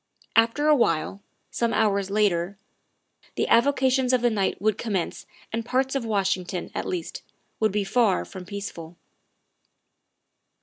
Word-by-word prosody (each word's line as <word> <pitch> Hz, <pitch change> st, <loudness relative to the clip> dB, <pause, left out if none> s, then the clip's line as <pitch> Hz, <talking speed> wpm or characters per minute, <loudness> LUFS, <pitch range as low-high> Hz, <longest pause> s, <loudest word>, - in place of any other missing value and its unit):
After 230 Hz, +7 st, +3 dB
awhile, 200 Hz, -, +2 dB, 0.3 s
some 235 Hz, -1 st, 0 dB
hours 200 Hz, -3 st, +1 dB
later, 200 Hz, -2 st, +1 dB, 0.8 s
the -, -, 0 dB
avocations 260 Hz, +1 st, +3 dB
of 250 Hz, -, +3 dB
the 240 Hz, -, +3 dB
night 200 Hz, -3 st, 0 dB
would 215 Hz, 0 st, +1 dB
commence 200 Hz, -7 st, -3 dB, 0.3 s
and 230 Hz, +1 st, -1 dB
parts 260 Hz, +3 st, 0 dB
of 275 Hz, -3 st, -1 dB
Washington, 190 Hz, -4 st, -1 dB
at -, -, -3 dB
least, 175 Hz, -3 st, -4 dB, 0.4 s
would 220 Hz, -1 st, +2 dB
be 205 Hz, +1 st, 0 dB
far 210 Hz, -1 st, +2 dB
from 185 Hz, -2 st, -9 dB
peaceful. 175 Hz, -4 st, -7 dB
210 Hz, 130 wpm, -25 LUFS, 190-235 Hz, 0.8 s, After